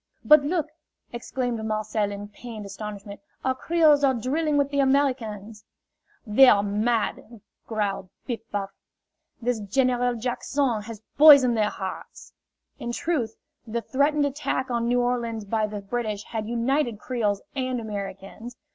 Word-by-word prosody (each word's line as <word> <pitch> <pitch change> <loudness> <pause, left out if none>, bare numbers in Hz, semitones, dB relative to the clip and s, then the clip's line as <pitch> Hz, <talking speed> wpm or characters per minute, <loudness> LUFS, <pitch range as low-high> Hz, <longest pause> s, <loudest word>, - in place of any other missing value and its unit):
"But, 300 -1 +8
look!" 315 +1 0 0.5
exclaimed 240 -1 -3
Marcel 215 -1 -1
in 205 0 -6
pained 215 0 -9
astonishment, 200 0 -8 0.3
"our 260 - +2
Creoles 305 +1 +3
are 265 -2 +4
drilling 290 +6 0
with 285 0 +1
the 280 - 0
Americans!" 235 -7 0 0.6
"They 245 +5 +6
are 200 -4 +5
mad!" 220 +2 -1 0.3
growled 205 -4 -2 0.2
Piff 240 -4 -3
Paff. 200 -1 -3 0.7
"This 245 -1 0
General 245 +3 +1
Jack 240 +1 -3
son 255 -5 0
has 220 0 -9 0.2
poisoned 280 -5 +8
their 210 -1 +2
hearts." 190 -2 -8 0.5
In 240 -3 -4
truth, 255 -6 -2 0.3
the 230 +1 -3
threatened 285 +2 +1
attack 270 -2 -2
on 235 -1 0
New 245 +1 +2
Orleans 235 -3 -2
by 215 +1 0
the 210 -1 -6
British 210 0 -3
had 220 -2 -5
united 240 +1 0
Creoles 210 -4 -2
and 255 -2 -1
Americans. 205 +2 -7
235 Hz, 140 wpm, -25 LUFS, 210-265 Hz, 0.7 s, But